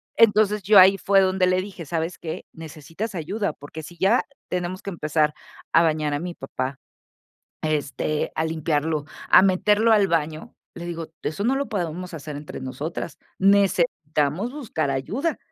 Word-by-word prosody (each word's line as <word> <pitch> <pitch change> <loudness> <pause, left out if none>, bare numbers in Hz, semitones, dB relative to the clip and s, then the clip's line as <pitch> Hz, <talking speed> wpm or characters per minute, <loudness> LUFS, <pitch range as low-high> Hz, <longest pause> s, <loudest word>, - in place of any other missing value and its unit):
Entonces, 210 -2 +4
yo 200 0 +7
ahí 190 +1 +7
fue 195 +1 +4
donde 185 0 +2
le 185 0 +2
dije: 190 -4 -8
"¿Sabes 165 +3 -2
qué? 160 -2 -6
Necesitas 160 +6 -7
ayuda, 185 +2 -2
porque 150 +2 -10
si 175 +3 -11
ya 200 +6 +3 0.2
tenemos 180 +1 -3
que 200 - -5
empezar 150 -3 0 0.4
a 165 - +6
bañar 155 -2 +1
a - - -2
mi 175 +1 -5
papá, 130 -1 -5 0.8
este, 155 0 -1
a 160 - +1
limpiarlo, 155 -1 -1 0.3
a - - +8
meterlo 210 +4 +3
al 205 -2 +5
baño", 155 -1 -2 0.2
le 175 0 -7
digo: 165 -2 -5
"Eso 180 +7 -3
no 265 +3 +2
lo 280 - -2
podemos 180 -3 -3
hacer 150 -1 -6
entre 145 -2 -8
nosotras, 140 +5 -5 0.2
necesitamos 180 - +2
buscar 210 - -2
ayuda". 230 - -2
170 Hz, 160 wpm, -24 LUFS, 155-195 Hz, 0.8 s, a